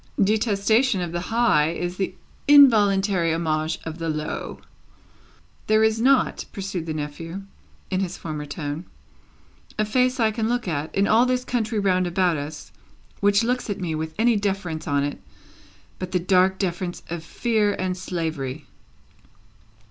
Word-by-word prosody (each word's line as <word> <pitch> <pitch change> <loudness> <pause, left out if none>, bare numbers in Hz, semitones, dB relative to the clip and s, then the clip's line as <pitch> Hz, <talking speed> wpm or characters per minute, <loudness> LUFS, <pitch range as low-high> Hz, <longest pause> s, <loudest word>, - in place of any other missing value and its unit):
"Detestation 220 +2 +2
of 175 -2 -3
the 175 - -2
high 225 -10 +3
is 175 +2 -4
the 190 -1 -2 0.3
involuntary 205 - +5
homage 160 -1 -1
of 160 +1 -7
the 165 0 -2
low." 155 0 -4 1.1
"There 215 0 +4
is 220 0 +2
not," 265 +1 +3
pursued 190 -4 -5
the 160 - -2
nephew, 165 +5 -6 0.5
in 185 - +1
his 185 -2 -3
former 150 -2 -5
tone, 145 +2 -5 0.9
"a 215 - +1
face 255 +4 +1
I 220 -2 +3
can 220 0 -1
look 245 -3 -1
at, 155 -2 -3
in 200 +1 +3
all 235 +3 +4
this 255 0 0
country 225 -3 -1
round 185 -3 +2
about 175 -1 +1
us, 145 +1 -7 0.5
which 205 +1 +3
looks 250 0 -1
at 205 - -3
me 175 -4 -2
with 160 0 -4
any 230 +1 +3
deference 190 -6 -3
on 140 -2 +1
it 145 - -4 0.8
but 185 0 -5
the 180 - +3
dark 185 +1 +3
deference 175 -2 -3
of 170 -1 -4
fear 215 +2 0
and 185 -1 -2
slavery." 160 -6 -4
185 Hz, 155 wpm, -24 LUFS, 165-215 Hz, 1.1 s, involuntary